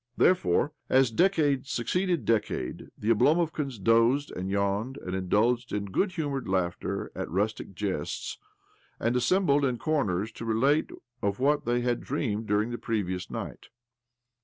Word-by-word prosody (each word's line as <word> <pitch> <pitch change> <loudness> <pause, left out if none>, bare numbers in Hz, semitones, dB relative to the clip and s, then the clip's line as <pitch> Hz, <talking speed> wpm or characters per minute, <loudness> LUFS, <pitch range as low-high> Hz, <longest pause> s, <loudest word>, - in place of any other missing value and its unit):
Therefore,, 145 - +3 0.2
as 130 -2 +4
decade 145 - +2
succeeded 170 - 0
decade, 105 - -1
the 110 +2 0
Oblomovkans 150 +1 +2
dozed 115 +8 +3
and 95 +1 -4
yawned, 100 +6 -1
and 95 -8 -6
indulged 115 +6 +1
in 105 -1 -2
good 190 - +1
humoured 145 - -3
laughter 90 -2 -2
at - - -4
rustic 100 +2 -2
jests, 95 -7 -3 0.6
and 115 +2 0
assembled 145 +2 +3
in 130 -3 +1
corners 110 - 0
to - - -9
relate 130 +7 +2 0.3
of 100 +2 -1
what 145 +3 +2
they 120 +1 +1
had 120 -1 0
dreamed 115 -6 -2
during 105 +3 +1
the 120 - -4
previous 95 -5 -2
night. - - -6
115 Hz, 140 wpm, -28 LUFS, 100-140 Hz, 0.6 s, as